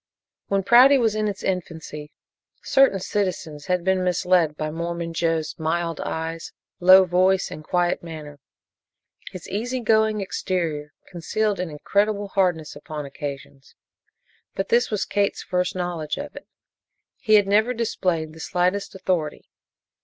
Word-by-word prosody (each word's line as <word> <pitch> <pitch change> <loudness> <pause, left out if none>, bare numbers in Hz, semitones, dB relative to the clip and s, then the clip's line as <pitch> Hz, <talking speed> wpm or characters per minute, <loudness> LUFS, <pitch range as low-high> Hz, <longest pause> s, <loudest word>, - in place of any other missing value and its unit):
When 195 -1 0
Prouty 255 +7 +7
was 225 -4 +2
in 215 0 0
its 200 -2 -5
infancy, 160 -5 -4 0.5
certain 270 -8 +4
citizens 180 -6 -3
had 180 -1 0
been 190 0 +1
misled 180 -3 +2
by 155 0 -3
Mormon 170 +1 -4
Joe's 165 -1 -1
mild 165 +1 -1
eyes, 160 0 -4 0.3
low 185 +1 +8
voice 185 +2 +2
and 155 - -8
quiet 175 +2 0
manner. 155 -3 -9 0.9
His 185 - -9
easy 245 +6 -2
going 220 -2 +2
exterior 170 -6 -3 0.2
concealed 200 +4 -2
an 180 -2 -2
incredible 200 +6 0
hardness 180 -6 0
upon 150 0 -7
occasions, 140 -1 -8 0.8
but 195 - -3
this 240 +1 +3
was 210 -2 -1
Kate's 200 -1 -1
first 180 -1 -1
knowledge 175 -4 -3
of 290 +1 -7
it. - - -11 0.7
He 215 -4 +5
never 210 +4 +2
had 250 - -3
displayed 170 -8 -1
the 160 - -13
slightest 180 +4 -1
authority. 180 -5 -2
180 Hz, 140 wpm, -23 LUFS, 160-200 Hz, 0.9 s, low